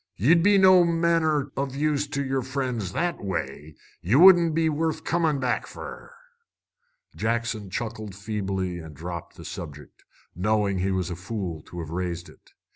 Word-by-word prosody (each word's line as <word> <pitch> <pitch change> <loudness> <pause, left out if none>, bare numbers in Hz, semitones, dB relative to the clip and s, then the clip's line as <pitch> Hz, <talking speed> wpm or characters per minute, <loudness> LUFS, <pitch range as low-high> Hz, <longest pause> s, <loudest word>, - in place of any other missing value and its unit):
Ye'd 160 - +4
be 205 +3 +5
no 185 -2 +7
manner 165 -4 +1
o' 140 +1 -1
use 145 +2 -1
to 140 0 -2
yer 135 0 0
friends 125 -7 -3
that 175 -6 -1
way. 80 -5 -4 0.3
Ye 100 +8 +1
wouldn't 170 -1 +7
be 165 0 +2
worth 160 +1 -1
comin' 160 -4 +1
back 125 -2 -1
fer." - - -9 1.0
Jackson 115 -2 -2
chuckled 110 -1 -5
feebly 95 -3 -3
and 80 -2 -10
dropped 85 +2 -7
the - - -11
subject, 75 -4 -9 0.3
knowing 100 +1 +1
he 95 +2 0
was 95 -2 -1
a - - -3
fool 90 -3 -5
to 85 - -7
have 80 -1 -7
raised 85 0 -3
it. - - -20
115 Hz, 160 wpm, -25 LUFS, 90-155 Hz, 1.0 s, no